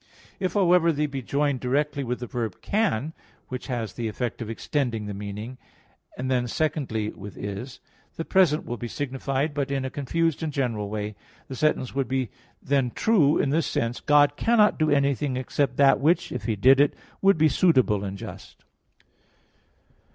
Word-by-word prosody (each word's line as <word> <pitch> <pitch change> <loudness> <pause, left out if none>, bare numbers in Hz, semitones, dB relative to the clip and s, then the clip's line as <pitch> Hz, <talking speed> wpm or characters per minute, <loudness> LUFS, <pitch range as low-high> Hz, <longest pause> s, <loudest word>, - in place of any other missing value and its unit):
If, 185 -1 -1
however, 180 -3 +4
they 150 -1 0
be 135 -2 -4
joined 140 +1 0
directly 140 +3 0
with 125 0 -3
the - - -3
verb 115 -5 -4
"can" 160 - 0 0.4
(which 130 -1 -6
has 120 -5 -3
the 115 -2 -3
effect 120 +2 -4
of 110 - -5
extending 115 -2 -2
the 105 - -5
meaning), 105 +5 -7 0.6
and 130 +1 -2
then 125 -1 +1
secondly 120 -7 -1
with 100 +1 -10
"is," 100 +6 -6 0.4
the 165 - -4
present 175 -6 +3
will 120 - -4
be 120 - -5
signified, 135 +2 -2
but 140 -1 -2
in 135 -1 -1
a 130 - -4
confused 165 +3 -1
and 160 -2 -2
general 115 -7 -2
way. 105 0 -4 0.3
The 130 - -5
sentence 140 -2 0
would 135 -2 -1 0.5
then 135 -2 +2
be 120 - -9
true 165 -10 +3
in 135 - +1
this 160 +2 +1
sense: 115 +1 -1
"God 145 -1 +4
cannot 220 -5 +3
do 155 -1 +2
anything 140 -1 +1
except 130 0 -1
that 140 -1 +5
which, 160 +6 +2
if 125 - -5
He 110 - 0
did 130 +7 +5
it, 145 0 +3 0.3
would 195 -2 +5
be 155 0 +5
suitable 130 - +3
and 100 0 -4
just." - - -10
135 Hz, 180 wpm, -25 LUFS, 120-150 Hz, 0.6 s, that